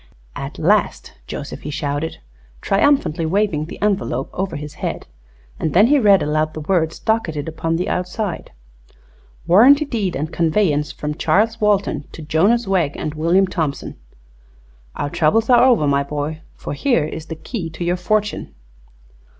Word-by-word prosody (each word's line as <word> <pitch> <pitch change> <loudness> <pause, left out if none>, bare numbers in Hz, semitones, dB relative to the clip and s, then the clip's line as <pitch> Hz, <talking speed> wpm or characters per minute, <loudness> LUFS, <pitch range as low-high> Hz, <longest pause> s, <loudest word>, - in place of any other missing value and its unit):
"At - - -6
last, - - +1
Joseph!" - - -6
he 150 - -6
shouted, 150 +1 -3 0.4
triumphantly 200 - +2
waving 160 -3 0
the 165 - -10
envelope 195 -11 -1
over 190 -2 -3
his 150 0 -7
head. - - -3 0.5
And 155 - -2
then 200 +4 +7
he 285 +4 +4
read 200 -5 +5
aloud 155 +1 -1
the 155 - -5
words 160 0 0
docketed 165 -10 -1
upon 165 +1 -2
the 175 - -2
outside: 180 +1 -3 0.9
"'Warranty 265 - +6
Deed 215 -10 -2
and 155 +4 -4
Conveyance 160 -3 +1
from 150 0 -4
Charles 225 +8 +1
Walton 200 -8 +1
to 160 - -9
Jonas 195 +11 +2
Wegg 175 -7 0
and 150 - -4
William 170 +5 +2
Thompson.' 160 -6 -3 1.0
Our 145 0 -3
troubles 225 +10 +2
are 245 - +6
over, 245 -11 +4
my 140 -1 +2
boy, 150 +2 -4
for - - -6
here 170 - +1
is 160 +1 -7
the 160 - -5
key 170 +1 -5
to 165 - -6
your 175 +1 +1
fortune." 210 - -1
165 Hz, 155 wpm, -20 LUFS, 150-210 Hz, 1.0 s, then